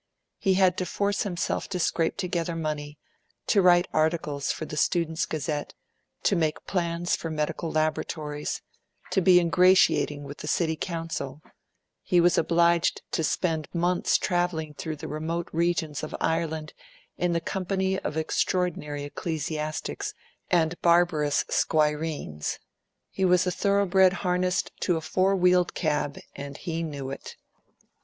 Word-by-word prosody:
He 190 -2 +2
had 185 -1 +4
to 185 - -1
force 200 +2 0
himself 180 -3 -2
to 185 - -2
scrape 165 -1 0
together 175 -3 -2
money, 150 -2 -4 0.5
to 200 - +4
write 175 0 +5
articles 155 -3 0
for 155 - -4
the 150 - -7
students' 165 +1 +1
Gazette, 150 -1 -3 0.5
to 200 - +3
make 160 -3 -1
plans 175 -1 0
for 165 - -5
medical 155 +1 -2
laboratories, 155 -1 -2 0.5
to 190 - +2
be 180 0 +7
ingratiating 175 -4 +4
with 140 +1 -8
the - - -6
City 160 +1 +1
Council; 165 -5 -4 0.6
he 180 - +2
was 175 +1 +4
obliged 170 +1 +2
to 165 - 0
spend 160 -1 0
months 175 +1 +2
travelling 175 -4 -1
through 155 +1 -5
the 145 - -7
remote 165 +3 -3
regions 165 -3 0
of - - -5
Ireland 160 -2 -1 0.4
in 175 -1 0
the 170 - +1
company 190 +2 -1
of 155 - -4
extraordinary 160 -2 -1
ecclesiastics 155 +1 -4 0.3
and 170 -1 +1
barbarous 170 -4 +3
squireens. 150 - 0 0.5
He 190 - -2
was 180 0 +4
a 180 - +1
thoroughbred 190 0 +3
harnessed 180 0 +1
to 175 -3 +1
a - - -4
four 190 +4 +2
wheeled 180 -1 +3
cab 150 -3 -1 0.2
and 140 0 -7
he 165 -2 -3
knew 140 -5 -4
it. 135 - -8
165 Hz, 140 wpm, -27 LUFS, 155-180 Hz, 0.6 s, be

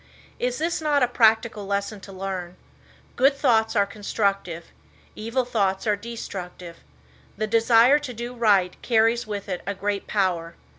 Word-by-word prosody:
Is 250 0 -1
this 335 +2 -1
not 295 -3 +2
a - - +4
practical 220 -3 +2
lesson 200 +1 -2
to 195 - -12
learn? 185 -2 -5 0.6
Good 275 +2 +3
thoughts 225 -5 +2
are 200 -1 +4
constructive. 200 -4 -2 0.4
Evil 230 +4 -2
thoughts 195 -5 0
are 210 -1 +2
destructive. 185 -6 -8 0.6
The 215 - 0
desire 230 +5 +5
to 290 -4 -6
do 240 +1 -6
right 205 -6 +2
carries 230 0 +2
with 205 -1 -5
it 180 -2 -3
a 200 - -2
great 200 0 -3
power. 175 -5 -1
215 Hz, 150 wpm, -24 LUFS, 195-235 Hz, 0.6 s, desire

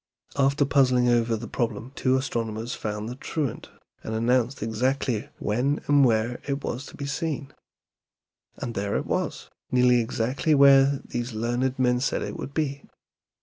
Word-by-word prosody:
After 140 +1 +3
puzzling 130 -3 +3
over 115 -1 +2
the 115 +2 -7
problem 115 +2 -3
two 130 -1 +2
astronomers 115 -3 -3
found 105 0 -4
the 120 - -4
truant, 140 -1 -4 0.3
and 110 - -4
announced 120 +2 +1
exactly 120 +1 -1
when 125 +7 0
and 145 -1 +5
where 115 0 +1
it 140 0 -2
was 130 +4 -4
to - - -12
be 140 - -4
seen. 145 -1 -3 1.0
And 120 - -5
there 100 0 -2
it - - -1
was, - - -3 0.2
nearly 125 -1 +4
exactly 125 +7 0
where 140 0 +6
these 120 0 -4
learned 120 +4 -1
men 125 -1 +2
said 140 - -1
it - - -5
would 140 - -7
be. 140 -3 -1
125 Hz, 155 wpm, -25 LUFS, 115-140 Hz, 1.0 s, where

